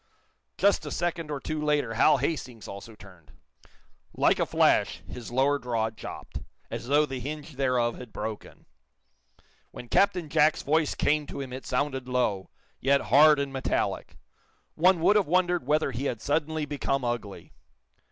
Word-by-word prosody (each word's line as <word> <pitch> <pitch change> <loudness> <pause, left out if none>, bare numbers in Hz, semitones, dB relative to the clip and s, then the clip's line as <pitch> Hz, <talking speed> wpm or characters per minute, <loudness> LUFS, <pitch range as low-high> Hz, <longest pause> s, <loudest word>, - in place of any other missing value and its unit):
Just 200 0 +3
a - - -5
second 170 -2 -2
or 145 -2 -3
two 155 +2 -4
later 145 -6 +1
Hal 135 +6 +4
Hastings 125 -8 -4
also 100 +3 -9
turned. 90 -6 -17 0.8
Like - - +3
a - - +1
flash - - +2
his 120 -2 -8
lower 135 +3 +2
jaw 115 -3 -1
dropped, 110 - -8 0.3
as 115 +1 -5
though 145 +3 +4
the 135 -3 -5
hinge 150 +4 -6
thereof 125 -3 0
had 125 -3 -10
broken. 110 0 -7 1.0
When 120 - -11
Captain 180 -4 +2
Jack's 150 +1 +2
voice 155 +1 +1
came 150 0 +1
to - - -7
him 130 -2 -6
it 130 - -7
sounded 130 -1 -1
low, 115 -7 0 0.3
yet 140 +1 +3
hard 150 +1 +7
and 140 -1 -3
metallic. 135 - -2 0.6
One 175 +1 +3
would 205 +5 +5
have 200 - +1
wondered 175 -3 +1
whether 150 -2 +2
he 130 +3 -4
had 120 -5 -2
suddenly 155 +3 -1
become 140 -2 -2
ugly. 115 -4 -5
140 Hz, 160 wpm, -27 LUFS, 120-155 Hz, 1.0 s, hard